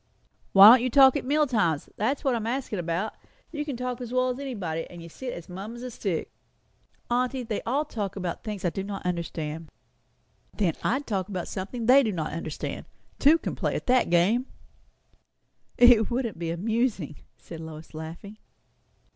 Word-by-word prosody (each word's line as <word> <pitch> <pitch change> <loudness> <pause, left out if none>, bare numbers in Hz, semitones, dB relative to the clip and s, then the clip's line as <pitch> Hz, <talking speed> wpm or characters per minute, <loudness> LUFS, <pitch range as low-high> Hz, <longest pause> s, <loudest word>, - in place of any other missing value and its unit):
"Why 195 +1 +11
don't 250 0 +7
you 255 - 0
talk 265 +1 +7
at - - -2
meal 300 +3 +3
times? 190 - 0
that's 260 +7 -1
what 270 - +2
I - - +1
am 225 -1 -4
askin' 245 -5 -2
about. 175 +5 -2 0.4
You 295 -2 -3
can 285 -5 -5
talk 250 0 -4
as 245 -1 -6
well 255 0 +2
as 250 +1 -3
anybody; 195 -13 -4
and 175 -1 -10
you 170 - -10
sit 250 +9 -6
as 170 - -8
mum 195 +6 -7
as 240 - -9
a 250 - -5
stick." 195 -7 -3 0.8
"Aunty, 250 +1 0
they 225 -3 -3
all 280 +6 +1
talk 210 -9 -4
about 180 -3 -4
things 210 -3 -5
I 175 - +2
do 195 - -4
not 195 -2 -6
understand." 165 -3 -3 0.9
"Then 185 -6 +1
I'd 270 +4 0
talk 195 -3 -2
of 185 -3 -4
something 210 +5 -5
they 260 +4 +7
don't 215 -8 -1
understand. 155 0 -4 0.3
Two 300 +4 +6
can - - -4
play - - -1
at - - -4
that 255 -5 +3
game." 200 +10 +3 1.3
"It 240 -3 +6
wouldn't 235 -7 -2
be 170 -1 -3
amusing," 200 - -1 0.2
said 165 - -10
Lois, 160 0 -9
laughing. 165 +7 -8
215 Hz, 185 wpm, -26 LUFS, 175-250 Hz, 1.3 s, Why